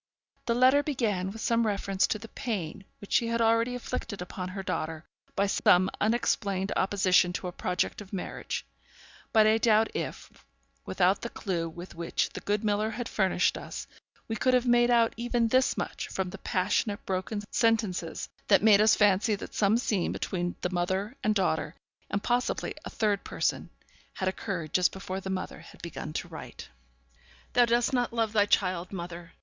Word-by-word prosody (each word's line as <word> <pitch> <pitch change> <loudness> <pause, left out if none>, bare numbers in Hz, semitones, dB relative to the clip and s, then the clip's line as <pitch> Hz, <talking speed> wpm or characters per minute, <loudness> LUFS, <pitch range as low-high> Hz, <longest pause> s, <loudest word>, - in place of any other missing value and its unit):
The 235 - +2
letter 260 +3 +5
began 225 -11 -1
with 220 +3 -8
some 230 -1 +2
reference 195 -2 +1
to - - -1
the 215 - -10
pain 205 - -4
which 205 - -8
she 235 - +3
had 230 0 0
already 230 +1 +3
inflicted 235 -3 -4
upon 180 +1 -5
her 195 +1 -5
daughter 160 -3 -3 0.3
by 200 - +2
some 185 -1 +4
unexplained 205 -3 +1
opposition 185 -2 +3
to 185 - -4
a - - -4
project 180 +2 -2
of 195 - -12
marriage; 195 -3 -4 0.7
but 220 -2 +6
I 220 +1 +4
doubt 220 -1 +4
if, - - -6 0.4
without - - +2
the - - -4
clue 170 -5 -3
with 175 +3 -10
which 170 0 -1
the - - -6
good 205 +1 -1
miller 210 +1 +1
had 240 +1 -4
furnished 190 -3 +1
us, - - -7 0.4
we 225 - -2
could 255 +3 +3
have 250 0 +2
made 240 0 +4
out 235 -1 +4
even 235 -1 0
this 255 +2 +3
much - - -3
from 190 -1 -3
the 195 - -9
passionate, 205 +3 0
broken 195 +3 -2
sentences 215 -8 0 0.2
that 200 -1 +5
made 210 -2 +7
us 215 0 +6
fancy 205 +1 +3
that 195 - -9
some 210 +2 +3
scene 210 -6 0
between 175 -1 -2
the 180 - -1
mother 190 +6 -1
and 215 0 +2
daughter 180 -4 0 0.3
and 200 0 -2
possibly 245 +1 0
a - - -6
third 205 -3 0
person - - -1 0.4
had 190 - -3
occurred 180 -4 -3
just 180 -1 +4
before 190 0 -5
the 190 - -6
mother 185 -1 -4
had - - -15
begun 165 -2 -6
to - - -3
write. - - -9 0.8
'Thou 245 0 +6
dost 235 +2 +2
not 245 -2 +1
love 225 -2 0
thy 205 -2 +4
child, 185 -3 +1
mother! 175 -2 -7
205 Hz, 180 wpm, -28 LUFS, 185-230 Hz, 0.8 s, made